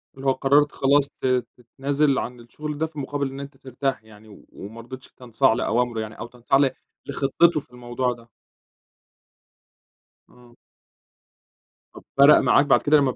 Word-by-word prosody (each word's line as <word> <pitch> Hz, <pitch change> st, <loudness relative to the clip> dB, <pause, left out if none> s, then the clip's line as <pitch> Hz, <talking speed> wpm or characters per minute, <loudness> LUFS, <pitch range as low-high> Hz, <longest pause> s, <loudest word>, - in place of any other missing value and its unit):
اللي 135 Hz, 0 st, -10 dB
هو -, -, +5 dB
قررت 145 Hz, +2 st, +2 dB
خلاص 140 Hz, +1 st, +2 dB
ت -, -, -10 dB, 0.3 s
تتنازل 140 Hz, +4 st, -1 dB
عن 125 Hz, 0 st, -6 dB
الشغل 150 Hz, +5 st, -7 dB
ده، 160 Hz, -, 0 dB
في 155 Hz, -2 st, -9 dB
مقابل 140 Hz, 0 st, -3 dB
إن 135 Hz, -, -8 dB
أنت 140 Hz, 0 st, -9 dB
ترتاح 130 Hz, -2 st, -4 dB
يعني 110 Hz, 0 st, -17 dB
و 100 Hz, -, -16 dB
ومرضيتش 115 Hz, +5 st, -11 dB
تنصاع 125 Hz, 0 st, +1 dB
لأوامره 120 Hz, 0 st, -1 dB
يعني 110 Hz, 0 st, -8 dB
أو 115 Hz, -, -6 dB
تنصاع 125 Hz, +3 st, 0 dB
ل 140 Hz, -2 st, +3 dB, 0.3 s
لخطته 150 Hz, +4 st, +2 dB
في 125 Hz, -, -18 dB
الموضوع 125 Hz, +1 st, -3 dB
ده. 115 Hz, 0 st, -17 dB, 2.0 s
إمم. 120 Hz, -1 st, -20 dB, 1.4 s
طب -, -, -13 dB
فرق 140 Hz, +2 st, +8 dB
معاك 145 Hz, -, +3 dB
بعد 140 Hz, -, +4 dB
كده 150 Hz, +1 st, +4 dB
لما 135 Hz, -3 st, +2 dB
ب -, -, -13 dB
130 Hz, 160 wpm, -23 LUFS, 120-140 Hz, 2.0 s, فرق